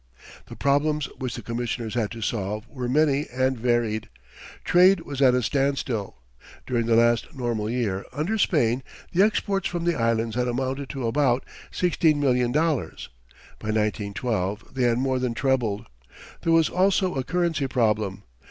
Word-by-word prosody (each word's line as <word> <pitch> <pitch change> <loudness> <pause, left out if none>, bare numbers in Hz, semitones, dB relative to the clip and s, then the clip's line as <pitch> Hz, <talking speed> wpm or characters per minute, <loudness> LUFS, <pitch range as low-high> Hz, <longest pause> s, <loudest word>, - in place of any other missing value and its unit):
The - - -9
problems 145 +1 +1
which 130 -2 -3
the 120 - -7
Commissioners 115 -1 -3
had 115 -4 0
to 115 - -8
solve 105 0 -3
were 125 -3 -5
many 145 +1 +2
and 130 +1 +1
varied. 115 -2 0 0.5
Trade 180 +1 +5
was 140 -3 -6
at 130 -2 +6
a 125 - +1
standstill. 135 -5 -1 0.5
During 120 -3 -1
the 115 - +4
last 120 +6 +2
normal 120 -4 -2
year 110 -6 -1
under 180 +10 -2
Spain 125 - +2 0.3
the 180 - +3
exports 200 -2 +1
from 175 -1 -3
the 175 - +2
Islands 115 -3 0
had 125 0 0
amounted 130 +3 -2
to 135 -4 -4
about 125 +1 +1 0.2
sixteen 165 -4 +2
million 125 -3 +2
dollars. 150 - -1 0.5
By - - -8
1912 105 -1 -2
they 130 -2 +1
had 120 -1 +2
more 130 0 0
than 125 -2 -2
trebled. 120 -5 0 0.6
There 165 - +1
was 165 -1 +5
also 190 0 +2
a 135 - -2
currency 165 -1 0
problem. 105 -6 0
125 Hz, 160 wpm, -25 LUFS, 115-145 Hz, 0.6 s, at